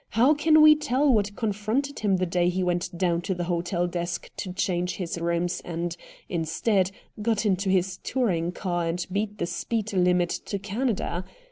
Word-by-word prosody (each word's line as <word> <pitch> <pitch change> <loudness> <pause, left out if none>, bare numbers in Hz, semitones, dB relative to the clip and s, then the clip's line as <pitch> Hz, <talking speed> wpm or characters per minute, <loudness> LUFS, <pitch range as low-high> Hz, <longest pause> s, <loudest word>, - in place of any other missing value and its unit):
How 250 +7 +4
can 310 +1 +5
we 305 0 +9
tell 285 -1 +2
what 205 -2 +1
confronted 220 +7 -1
him 200 -3 +2
the 185 - 0
day 175 0 +1
he 185 +1 -1
went 175 -1 -1
down 170 -1 +1
to 190 +1 -2
the 175 - -2
hotel 175 0 -1
desk 175 0 -4
to 185 - -4
change 180 -2 -1
his 175 -2 -4
rooms 170 +1 -1
and, 170 0 -3 0.3
instead, 180 +4 +1 0.3
got 220 0 +1
into 195 -1 +1
his 185 0 +1
touring 180 -10 0
car 175 -2 -2
and 175 +1 -2
beat 210 +2 -2
the 170 - -1
speed 210 +5 -3
limit 180 -2 +3 0.2
to 200 - -2
Canada. 200 -3 -2
185 Hz, 175 wpm, -26 LUFS, 175-215 Hz, 0.3 s, we